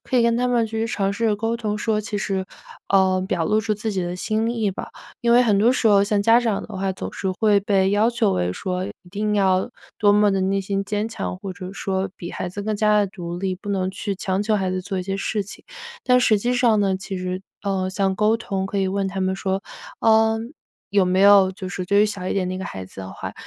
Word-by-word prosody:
可 260 - -1
以 240 - +5
跟 235 0 +3
他 250 - +1
们 240 -2 +2
去 225 +1 -2
尝 200 -4 -1
试 230 +3 -1
着 210 -2 +2
沟 225 +2 -1
通 215 -3 -2
说， 215 -1 0
其 210 -1 -4
实， 195 -1 -2 0.4
呃， 190 -1 +3
表 170 -4 0
露 215 +5 +2
出 215 0 -1
自 215 +2 -3
己 190 - -1
的 175 0 -3
心 220 +4 -1
意 225 -4 0
吧。 190 - -7 0.3
因 235 0 +2
为 245 +1 +6
很 210 -4 +3
多 230 +5 +4
时 250 - +1
候 200 -1 +5
像 205 0 +1
家 230 +3 +5
长 225 -4 -1
的 215 - -8
话， 190 0 -1
总 - - -6
是 190 -2 -2
会 205 +2 +3
被 195 -1 +2
要 210 +3 +3
求 235 - +1
为 90 -1 0
说 185 - -3
一 - - -6 0.2
定 210 +2 -1
要， 190 +2 +2 0.3
多 205 -2 +5
么 210 0 +4
地 195 - 0
内 195 +1 +1
心 195 0 -2
坚 210 +2 -2
强， 225 -4 -4
或 195 0 -6
者 185 0 -8
说 190 -1 -2
比 170 - -7
孩 180 - -4
子 205 +3 -6
更 215 +1 -1
加 210 0 +3
地 205 - +3
独 175 -2 -6
立， 190 0 -1
不 200 +3 -11
能 190 -2 0
去 200 0 -4
强 190 +1 -1
求 215 0 +1
孩 190 -2 -1
子 185 - -2
做 190 0 -3
一 - - -2
些 195 0 -2
事 205 +1 -2
情。 200 - -10 0.4
但 250 -1 +5
实 220 -4 +3
际 245 +4 0
上 230 -4 +3
呢， 195 -2 +1
其 195 0 -6
实， 185 0 -3 0.2
呃， 190 -2 -1
像 190 0 0
沟 215 +2 +3
通 195 -4 -3
可 200 - -5
以 190 -1 +1
问 195 0 -1
他 190 0 -4
们 190 0 0
说， 195 0 -2 0.4
呃， 220 0 +4 0.5
有 200 -2 +3
没 185 +1 +1
有 200 -1 +7
就 185 -1 -7
是 185 -1 -4
对 200 +3 +4
于 215 - +4
小 200 -3 -5
一 - - -1
点 185 -2 0
那 185 - -3
个 190 - -5
孩 95 - -6
子 95 - -11
的 95 0 -7
话， - - -6
200 Hz, 280 characters per minute, -22 LUFS, 190-215 Hz, 0.5 s, 有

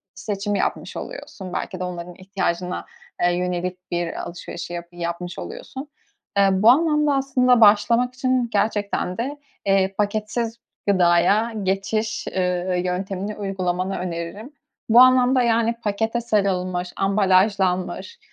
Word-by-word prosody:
seçim 205 0 -3
yapmış - - -2
oluyorsun, 190 - -8
belki 185 - -4
de 185 - -3
onların 175 -1 -6
ihtiyacına, 185 -2 -3 0.4
eee, 175 - +4
yönelik 180 0 -3
bir 175 -1 -1
alışverişi 175 0 -7
yap 170 0 -5
yapmış 175 +1 -5
oluyorsun. 270 +2 -7 0.5
Eee, 195 -1 +5
bu 190 +4 +5
anlamda 300 +1 +4
aslında 255 -3 +3
başlamak 225 +4 +5
için 255 -2 0
gerçekten 205 -3 0
de, 275 +5 -3 0.3
eee, 195 0 +2
paketsiz 215 +3 -1 0.3
gıdaya 190 +4 +3
geçiş, 205 +4 -1
ııı, 180 0 0
yöntemini 190 +3 -3
uygulamanı 190 -1 -2
öneririm. 180 - -5 0.4
Bu 235 - +7
anlamda 255 0 +5
yani 230 -1 +2
pakete 225 +3 -1
sarılmış, 185 -5 0
ambalajlanmış, 195 - +1
195 Hz, 120 wpm, -22 LUFS, 180-230 Hz, 0.5 s, Bu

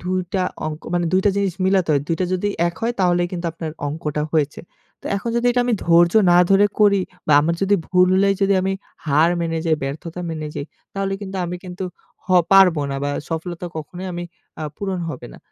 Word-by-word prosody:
২ 185 +1 -1 0.2
টা 185 - +2 0.2
অংক, 155 0 -5
মানে 175 -1 +1
২ 185 - +4
টা 205 - +5
জিনিস 200 -3 0
মিলাতে 190 -2 +2
হয়। 140 - +2
২ 165 - +1
টা - - +3
যদি 205 +3 -1 0.2
এক 170 - -7
হয় 235 +1 +1
তাহলে 175 -1 +3
কিন্তু 175 -1 -3
আপনার 165 -1 -5 0.2
অঙ্কটা 150 0 -3
হয়েছে। 150 -3 0 0.4
তো - - -8
এখন 215 +4 -3
যদি 235 +1 +1 0.2
আমি 245 - 0
ধৈর্য 170 0 +5 0.2
না 175 - +6
ধরে 195 +1 +6
করি 200 -2 +5 0.3
বা 155 - +3
আমার 165 +3 +1
যদি 195 +1 +3
ভুল 180 0 +4
হলেই 195 +1 +3
যদি 195 0 +3
আমি 190 - 0 0.3
হার 155 +4 +4
মেনে 165 -1 -1
যাই, 160 -1 +3
ব্যর্থতা 160 +6 -5
মেনে 155 -2 -4
যাই, 140 - -4 0.3
তাহলে 195 0 -2
কিন্তু 195 -1 -6
আমি 180 +1 -4
কিন্তু 180 +1 -6 0.4
হ - - -28 0.2
পারব 190 -3 +7
না 135 - -2
বা 145 - 0 0.2
সফলতা 170 +2 -4
কখনোই 175 +5 -6 0.5
আ - - -3
পূরণ 195 -2 -3
হবে 145 -6 -6
না। - - -13
175 Hz, 210 wpm, -21 LUFS, 160-195 Hz, 0.5 s, পারব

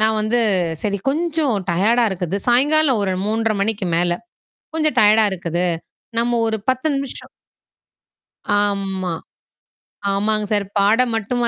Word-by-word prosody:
நான் 220 0 +3
வந்து, 220 +3 +1 0.4
சரி 200 -1 -1
கொஞ்சம் 310 -3 0 0.2
டயர்டா 220 +8 +3
இருக்குது. 185 -1 -3
சாயங்காலம் 275 0 +3
ஒரு 190 -2 0
3:30 220 +1 0
மணிக்கு 205 -2 -1
மேல 175 +1 +1 0.6
கொஞ்சம் 310 -1 0
டயர்டா 215 +1 +5
இருக்குது. 175 -1 -2 0.5
நம்ம 240 0 +1
ஒரு 220 0 0
10 260 +4 +1
நிமிஷம் 275 -1 -5 1.3
ஆம்மா. 195 -3 -2 1.0
ஆமாங்க 210 +2 0
சார். 205 -1 +1
பாடம் 225 +4 +3
மட்டுமா 235 +2 -1
220 Hz, 120 wpm, -20 LUFS, 200-245 Hz, 1.3 s, டயர்டா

